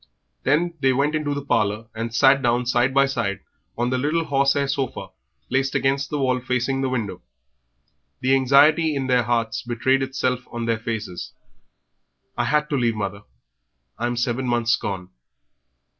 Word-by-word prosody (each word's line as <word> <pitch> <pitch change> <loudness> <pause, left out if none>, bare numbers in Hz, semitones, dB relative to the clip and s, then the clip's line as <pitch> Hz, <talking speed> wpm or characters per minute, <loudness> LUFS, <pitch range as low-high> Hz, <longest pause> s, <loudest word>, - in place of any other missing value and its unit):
Then 165 +6 +1
they 135 -1 +3
went 140 +4 +1
into 150 -2 -1
the 145 -1 -5
parlour 110 -3 0
and 115 +1 -4
sat 135 +4 +4
down 120 0 +1
side 120 +1 +2
by 140 +1 +4
side 115 -7 -2 0.4
on 120 +1 0
the 130 - 0
little 155 +5 0
horsehair 140 0 +2
sofa 135 -1 -3 0.4
placed 135 +1 0
against 135 +1 +1
the 150 - -2
wall 130 -2 +1
facing 125 +1 -1
the 135 - 0
window. 115 -6 -3 1.0
The 130 +1 +2
anxiety 145 +4 +4
in 135 -1 -1
their 125 -1 +3
hearts 115 -1 -1
betrayed 130 +3 +1
itself 130 -1 -1
on 120 -1 -4
their 115 -1 0
faces. 110 -6 -5 1.0
"I - - 0
had 150 0 +1
to 145 - +1
leave, 120 -3 +1
mother. 100 -1 -4 0.8
I'm 120 +1 -1
seven 120 +2 -1
months 120 -1 +2
gone." 95 -3 -5
130 Hz, 160 wpm, -23 LUFS, 120-140 Hz, 1.0 s, sat